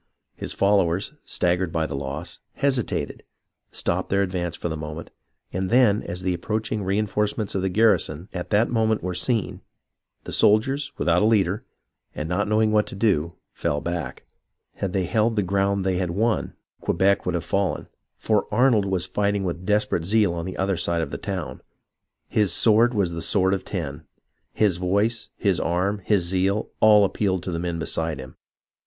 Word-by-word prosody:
His -, -, -4 dB
followers, 100 Hz, -, +1 dB
staggered 90 Hz, 0 st, 0 dB
by 80 Hz, -1 st, 0 dB
the -, -, -5 dB
loss, 70 Hz, +6 st, -5 dB
hesitated, 135 Hz, -5 st, -1 dB, 0.5 s
stopped -, -, -1 dB
their 100 Hz, 0 st, +2 dB
advance 90 Hz, -2 st, -2 dB
for -, -, -4 dB
the 80 Hz, -, -3 dB
moment, 75 Hz, +1 st, -7 dB, 0.4 s
and 95 Hz, 0 st, -2 dB
then, 115 Hz, -4 st, +4 dB
as 90 Hz, +1 st, -5 dB
the 90 Hz, 0 st, +1 dB
approach 105 Hz, +5 st, -3 dB
ing 105 Hz, -2 st, -1 dB
reenforcements 105 Hz, +2 st, -1 dB
of 95 Hz, -, -1 dB
the 95 Hz, -, 0 dB
garrison 95 Hz, -5 st, +2 dB
at 90 Hz, -1 st, -5 dB
that 110 Hz, +3 st, +2 dB
moment 110 Hz, -2 st, +1 dB
were 90 Hz, 0 st, -2 dB
seen, 110 Hz, +2 st, 0 dB, 0.6 s
the -, -, -7 dB
soldiers, 135 Hz, +7 st, +2 dB
without 85 Hz, 0 st, +2 dB
a -, -, +3 dB
leader, 105 Hz, -2 st, +2 dB, 0.5 s
and 75 Hz, -, -3 dB
not 90 Hz, +5 st, 0 dB
knowing 110 Hz, +1 st, +2 dB
what 105 Hz, -1 st, +2 dB
to -, -, -8 dB
do, 90 Hz, -6 st, +1 dB, 0.2 s
fell 75 Hz, -, -1 dB
back. 85 Hz, +1 st, -5 dB, 0.5 s
Had 95 Hz, -, -2 dB
they 95 Hz, 0 st, 0 dB
held 110 Hz, +4 st, +1 dB
the 105 Hz, -, +1 dB
ground 100 Hz, +1 st, 0 dB
they 95 Hz, -1 st, +1 dB
had 90 Hz, -1 st, -1 dB
won 110 Hz, +6 st, 0 dB, 0.2 s
Quebec 100 Hz, 0 st, +1 dB
would 90 Hz, -, 0 dB
have 85 Hz, -, -3 dB
fallen, 100 Hz, -1 st, -1 dB, 0.3 s
for 110 Hz, -1 st, 0 dB
Arnold 115 Hz, -2 st, +3 dB
was 95 Hz, -3 st, 0 dB
fighting 100 Hz, +1 st, 0 dB
with 90 Hz, 0 st, -4 dB
desperate 105 Hz, -5 st, +1 dB
zeal 105 Hz, 0 st, +2 dB
on 85 Hz, -1 st, -4 dB
the 95 Hz, -, -6 dB
other 95 Hz, -1 st, 0 dB
side 85 Hz, 0 st, 0 dB
of 70 Hz, -, -6 dB
the -, -, -3 dB
town. -, -, -5 dB, 0.7 s
His 105 Hz, -4 st, +2 dB
sword 115 Hz, +6 st, +4 dB
was 95 Hz, -4 st, +1 dB
as -, -, -6 dB
the 85 Hz, -, -4 dB
sword 95 Hz, +1 st, +2 dB
of 95 Hz, -1 st, -2 dB
ten. 70 Hz, +4 st, -5 dB, 0.4 s
His 100 Hz, -5 st, +2 dB
voice, 100 Hz, +5 st, 0 dB
his 100 Hz, -4 st, +1 dB
arm, 95 Hz, +4 st, 0 dB
his 100 Hz, -2 st, +2 dB
zeal, 95 Hz, +4 st, 0 dB
all 105 Hz, -1 st, +6 dB
appealed 95 Hz, -2 st, -1 dB
to 90 Hz, -, -4 dB
the 85 Hz, -, -2 dB
men 85 Hz, -1 st, -2 dB
beside 80 Hz, -1 st, -1 dB
him. 65 Hz, 0 st, -10 dB
95 Hz, 185 wpm, -24 LUFS, 85-105 Hz, 0.7 s, all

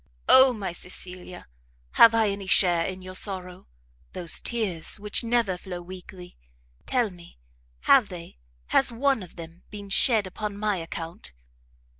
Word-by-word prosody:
Oh 260 Hz, 0 st, +9 dB
my 205 Hz, -6 st, -5 dB
Cecilia! 180 Hz, +1 st, -7 dB, 0.4 s
have 230 Hz, -1 st, +7 dB
I 220 Hz, -2 st, +3 dB
any 200 Hz, -1 st, -6 dB
share 175 Hz, -3 st, +3 dB
in 185 Hz, 0 st, -7 dB
your 185 Hz, 0 st, -9 dB
sorrow? 185 Hz, -2 st, -5 dB, 0.5 s
Those 175 Hz, -3 st, -2 dB
tears, 210 Hz, -6 st, -2 dB
which 210 Hz, +2 st, -3 dB
never 230 Hz, -6 st, 0 dB
flow 180 Hz, -2 st, -7 dB
weakly, 180 Hz, 0 st, -12 dB, 0.5 s
tell 245 Hz, -5 st, 0 dB
me, 175 Hz, -, -16 dB, 0.4 s
have 265 Hz, -6 st, +4 dB
they 170 Hz, -, -10 dB, 0.3 s
has 270 Hz, -, +3 dB
one 265 Hz, +1 st, 0 dB
of 180 Hz, -, -12 dB
them 165 Hz, 0 st, -11 dB
been 205 Hz, -1 st, -10 dB
shed 220 Hz, -1 st, +3 dB
upon 200 Hz, +2 st, -6 dB
my 210 Hz, -1 st, -1 dB
account?" 165 Hz, -, -7 dB
190 Hz, 145 wpm, -25 LUFS, 180-220 Hz, 0.5 s, Oh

